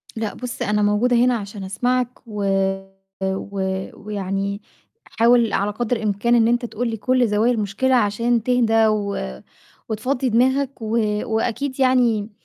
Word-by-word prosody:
لأ، 220 -2 -3
بُصّ 250 -1 -7
أنا 210 0 +1
موجودة 210 +4 +2
هنا 245 +1 +3
عشان 200 -1 -7
أسمعك 245 +6 0 0.2
و 210 -2 -4 0.8
و 195 +1 -3 0.3
ويعني 200 0 -4 0.4
حاول 235 -1 +3
على 205 +1 +1
قدر 240 +3 -1
الإمكان 215 +2 +1
إن 225 -1 +4
أنت 240 +1 +1
تقول 240 +1 -3
لي 225 - -3
كُلّ 255 +2 +2
زوايا 215 +3 +2
المشكلة 230 +4 0
عشان 230 +1 +1
تهدى 225 -3 +3
و 205 -2 -1 0.7
وتفضِّي 250 +4 -1
دماغك 260 +3 +1
و 220 +1 -1 0.3
وأكيد 245 +5 -2
يعني 245 -5 +2
225 Hz, 140 wpm, -21 LUFS, 210-245 Hz, 0.8 s, إن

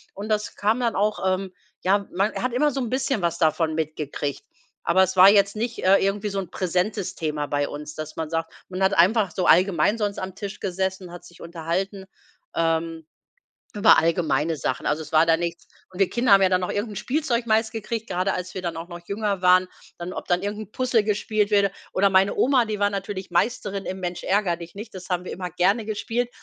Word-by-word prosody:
Und 205 +2 -6
das 210 -1 -1
kam 215 +4 +1
dann 235 -2 0
auch 210 +2 +1
ähm, 185 0 -3 0.3
ja, 200 +2 +2
man 195 +4 0
hat 255 -1 -2
immer 295 +4 +2
so 270 - -3
'n 240 - -3
bisschen 260 -2 -1
was 170 -1 0
davon 160 -1 +1
mitgekriegt. 150 -2 -3 0.4
Aber 190 - +4
es 190 0 -1
war 185 +2 +10
jetzt 200 0 +4
nicht, 230 +2 -3
äh, 195 +1 +6
irgendwie 205 +2 0
so 195 -1 -2
'n 185 -4 -5
präsentes 185 +2 -1
Thema 150 -4 -2
bei 145 0 0
uns, 150 +1 -7
dass 155 0 -7
man 160 -2 -4
sagt 165 0 -2 0.2
man 185 0 -5
hat 190 +1 +3
einfach 195 +4 +4
so 180 +2 -2
allgemein 185 +3 +4
sonst 205 -2 -2
am 185 -1 -5
Tisch 200 0 -6
gesessen, 190 -1 -3
hat 175 0 -10
sich 175 -1 -16
unterhalten, 175 +4 -3 0.5
ähm, 165 -1 -1 0.7
über 210 +1 +6
allgemeine 160 -2 +1
Sachen. - - -3
Also 150 +2 0
es 155 - -13
war 160 0 +5
da 165 -1 +4
nichts 170 0 -4 0.2
und 180 - -11
wir 195 - +3
Kinder 240 -2 +1
haben 195 0 +8
ja - - +6
dann 185 0 +2
noch 180 - -2
irgend 210 +2 -2
'n - - -10
Spielzeug 245 0 -1
meist 220 0 +2
gekriegt, 225 0 -5
grade 185 +1 0
als 180 0 -5
wir 185 - -5
dann 170 -2 -4
auch 165 +1 -6
noch 175 -1 -9
jünger 200 -2 -2
waren, 185 0 +5 0.3
dann 175 +1 -6
ob - - -7
dann 175 -1 +1
irgend 205 +1 -3
'n 215 -1 -10
Puzzle 250 -3 +1
gespielt 210 0 0
wurde. 200 -2 +3 0.2
Oder 200 +1 +3
meine 195 +1 +3
Oma, 255 -3 +3
die 215 -2 -4
war 205 0 +3
natürlich 195 -1 -5
Meisterin 200 +1 -1
im 190 - -4
Mensch-ärgere-dich-nicht, 185 +2 -2
das 185 -2 -9
haben 180 0 -1
wir - - -5
immer 180 -1 -5
gerne 195 +7 +1
gespielt. 225 +3 -2
190 Hz, 220 wpm, -24 LUFS, 175-210 Hz, 0.7 s, war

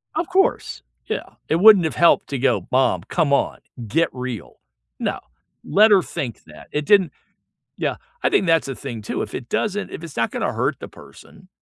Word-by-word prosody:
Of 330 +1 -1
course, 385 +2 0 0.3
yeah, - - -5
it 160 - +2
wouldn't 200 -2 +7
have 160 - -2
helped 170 - +4
to 140 - -2
go, 135 - +1
"Mom, 125 -9 +2
come 150 - 0
on, 140 - 0 0.3
get 165 +10 +1
real." 125 -6 -7 0.4
No, - - -2 0.4
let 215 +3 +4
her 195 -3 +6
think 125 -8 -6
that, 75 -1 -14
it 150 0 -2
didn't 195 0 +4 0.7
Yeah, - - -2 0.3
I - - +3
think - - +2
that's 165 -1 +3
the 135 - -4
thing 120 -5 -7
too, 105 - -3
if 105 - -7
it 120 - -6
doesn't 210 -1 -2
if - - -8
it's 160 - -10
not 115 - 0
gonna - - -2
hurt - - -1
the - - -8
person 185 0 -16
160 Hz, 195 wpm, -21 LUFS, 125-190 Hz, 0.7 s, wouldn't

